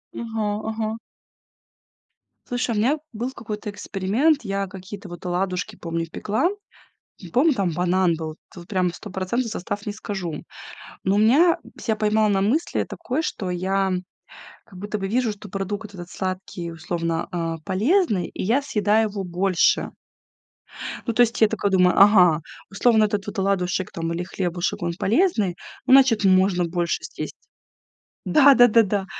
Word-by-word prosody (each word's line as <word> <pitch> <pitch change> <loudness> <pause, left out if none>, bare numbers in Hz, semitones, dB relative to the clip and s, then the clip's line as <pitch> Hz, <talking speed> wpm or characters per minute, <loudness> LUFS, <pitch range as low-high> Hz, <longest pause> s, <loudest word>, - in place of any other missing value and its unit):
Ага, 225 -2 -3 0.2
ага. 220 0 -3 1.5
Слушай, 245 -1 -1
у - - -1
меня 260 +8 +2 0.2
был 240 +4 -3
какой-то 215 -4 -6
эксперимент. 210 +10 +1
Я 195 -2 -2
какие-то 190 +1 -9
вот 175 +1 -10
оладушки, 180 +1 -2
помню, 165 -1 -4
пекла, 220 - 0 0.8
помню, 290 +4 +4
там 195 -6 0
банан 180 +1 +2
был, 160 -1 -6 0.2
вот 175 -1 -11
прям 185 -3 0
стопроцентный 205 +6 -3
состав 205 -1 -5
не 210 - -2
скажу. 195 -6 -5 0.6
Но 195 +2 +2
меня 285 +11 +5 0.2
ся 220 -2 -1
поймала 215 0 +2
на 195 -2 +2
мысли 245 - 0
такой, 265 +6 -3
что 190 - -3
я 190 +2 0 0.7
как 190 -5 -14
будто 205 +2 -4
бы 195 -1 -3
вижу, 235 +1 +1
что 205 0 -11
продукт 200 +2 -5
этот 175 -1 -9
сладкий, 185 -2 -4
условно, 165 0 -3
э, 165 -2 -2
полезный, 210 - +2
и - - -6
я 230 +9 +2
съедаю 215 -5 +1
его 200 -1 -5
больше. 180 0 +1 1.2
Ну, 230 - 0
то 245 - +3
есть 230 -1 -1
я 220 - +7
такая 210 -2 -1
думаю: 180 -1 +4
"Ага, 180 -6 +6 0.3
условно, 220 +2 +4
этот 205 -1 -2
вот 205 0 -4
оладушек 190 -1 0
там 165 0 -3
или 175 +1 -3
хлебушек, 175 -1 -2
он 170 0 -1
полезный, 215 - +2 0.3
ну, 260 - +4
значит, 260 -6 +6
можно 185 -1 +4
больше 170 0 -2
съесть". - - -6 0.9
Да-да-да, 245 -6 +6
да. 200 -1 -1
200 Hz, 150 wpm, -23 LUFS, 180-220 Hz, 1.5 s, я